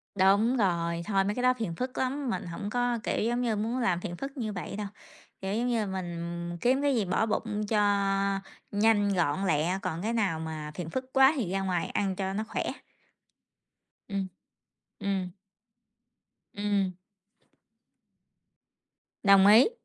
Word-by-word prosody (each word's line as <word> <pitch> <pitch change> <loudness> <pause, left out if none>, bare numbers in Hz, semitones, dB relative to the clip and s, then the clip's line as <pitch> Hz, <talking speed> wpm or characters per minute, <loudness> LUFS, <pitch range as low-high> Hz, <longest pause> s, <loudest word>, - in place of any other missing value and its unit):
Đúng 200 +6 +4
rồi, 170 -4 +1
thôi, 195 -2 +2
mấy 205 +2 -1
cái 250 - -2
đó 255 0 +5
phiền 220 -9 -4
phức 255 +7 -4
lắm, 265 +1 -1
mình 215 - -2
hổng 175 +4 -5
có, 245 +1 0
kiểu - - 0
giống 240 +2 0
như, 235 -3 +1
muốn 225 +5 -1
làm 185 -8 +1
phiền 175 - -4
phức 275 +1 -6
như 215 -4 -2
vậy 180 +1 -5
đâu, 210 0 -3 0.5
kiểu 190 +1 -2
giống 240 +2 0
như, 230 -3 +1
mình 175 -2 -4
kiếm 260 +3 +3
cái 285 -2 +2
gì 215 - +1
bỏ 185 +4 +1
bụng 215 -1 -1
cho 215 -1 +2 0.9
nhanh, 205 -1 +3
gọn, 175 +2 +1
lẹ, 170 +3 +1
còn 170 -2 -3
cái 225 +4 -1
nào 195 -8 +1
mà 155 -1 -5
phiền 175 -3 -5
phức 260 +6 -5
quá 265 +2 +6
thì 215 -10 -2
ra 195 0 0
ngoài 180 -3 0
ăn 195 -2 -1
cho 190 0 -2
nó 215 +2 -1
khỏe. - - -2 1.5
Ừm, 195 -1 -2 0.7
ừm. 195 -3 -1 1.2
Ừm. 205 -2 +1 2.3
Đồng 195 -1 +7
ý. 220 - +8
200 Hz, 165 wpm, -29 LUFS, 180-230 Hz, 2.3 s, ý